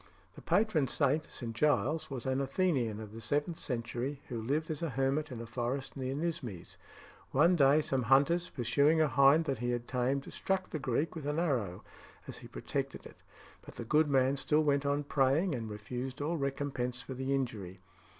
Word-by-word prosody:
The - - -12
patron 175 -6 +2
saint, 145 +3 +1
St. 115 -3 -6
Giles, 150 +3 +1
was 130 -4 -5
an 130 +1 0
Athenian 135 - 0
of 110 -1 -9
the 115 - -8
seventh 145 +8 -1
century, 125 +2 -3
who 120 -3 -3
lived 150 +8 -1
as 155 - -4
a 165 - -1
hermit 135 +3 0
in 120 - -6
a 115 - -6
forest 125 +4 -3
near 130 -1 -3
Nismes. 135 - -4 0.5
One 180 +2 +4
day 145 0 +5
some 135 -2 0
hunters, 145 +8 +3
pursuing 140 +6 +2
a 155 - +4
hind 140 +3 +5
that 135 -5 -2
he 120 +1 -1
had 120 -1 -2
tamed, 130 +2 -1
struck 190 -1 -1
the 155 - -3
Greek 135 +4 -1
with 155 -4 -6
an 150 +1 -1
arrow 125 - -1 0.4
as - - -7
he - - -11
protected - - -4
it, - - -13 0.4
but - - -13
the 120 - -6
good 150 +4 +3
man 135 0 +3
still 150 +3 +2
went 140 -1 +1
on 145 +1 +1
praying, 145 +5 +2
and 115 -4 -4
refused 125 +6 -5
all 155 +4 -1
recompense 135 -3 -2
for 135 - -6
the 130 +1 -3
injury. 105 -9 -4
135 Hz, 190 wpm, -32 LUFS, 125-150 Hz, 0.5 s, day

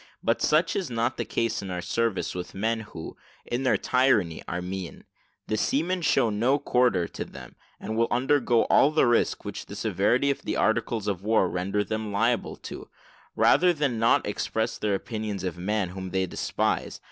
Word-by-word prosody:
But - - +1
such 160 +3 +2
is 190 -7 -2
not 115 0 -1
the - - -2
case 115 0 -1
in 100 - -7
our 90 -1 -3
service 115 +4 -1
with 90 0 -6
men 110 +3 0
who, 95 -7 -8 0.3
in 120 +2 -2
their 130 - +3
tyranny, 125 -11 +2
are 90 - -3
mean; 90 0 -6 0.4
the 110 - -1
seamen 175 - 0
show 120 -7 +2
no 120 +7 +2
quarter 125 -10 +2
to - - -5
them, - - -12 0.2
and 110 - -4
will 115 +1 +2
undergo 125 -2 +2
all 140 - +5
the 155 0 +3
risk 120 -1 +1
which - - -6
the - - -8
severity 140 +3 +1
of 140 - -4
the - - -3
articles 110 -1 0
of 95 -3 -1
war 105 -2 +2
render 95 +4 -1
them 110 0 -3
liable 115 +4 0
to, - - -9 0.5
rather 180 0 +5
than 140 -7 -1
not 115 +1 +3
express 110 +2 -2
their 105 -2 +1
opinion 105 -2 -4
of 90 -3 -3
a - - -7
man 105 -1 0
whom 95 +1 -6
they 95 +1 0
despise. 90 - -2
110 Hz, 190 wpm, -26 LUFS, 95-125 Hz, 0.5 s, all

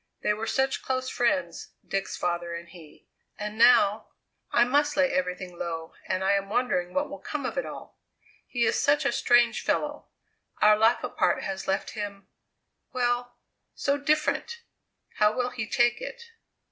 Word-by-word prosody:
They 210 - +2
were 220 +2 -4
such 265 +2 0
close 255 0 -2
friends, 275 +4 -1
Dick's 195 0 -2
father 175 -1 -2
and 170 0 -8
he! 165 -3 -15 0.3
And 210 0 -5
now 220 -2 +5 0.4
I 235 - +5
must 290 +3 +1
lay 275 -1 +3
everything 180 -9 -3
low, 165 -1 -4
and 185 0 -1
I 190 - +3
am 200 0 0
wondering 205 -6 0
what 285 +1 +1
will - - -8
come - - -5
of - - -3
it - - -2
all. - - -10 0.5
He 240 -2 0
is - - +1
such 290 +1 +2
a - - +3
strange 240 -1 +3
fellow; - - -1 0.5
our 210 0 +6
life 225 +3 +3
apart - - 0
has 190 0 -4
left 195 +1 -1
him 205 -2 -6 0.6
well, 245 -1 -1 0.4
so 280 - +1
different! 305 +11 0 0.5
How 210 -1 +4
will 250 0 0
he 240 -3 -4
take 240 - +2
it?" 475 -2 -8
235 Hz, 165 wpm, -27 LUFS, 195-260 Hz, 0.6 s, our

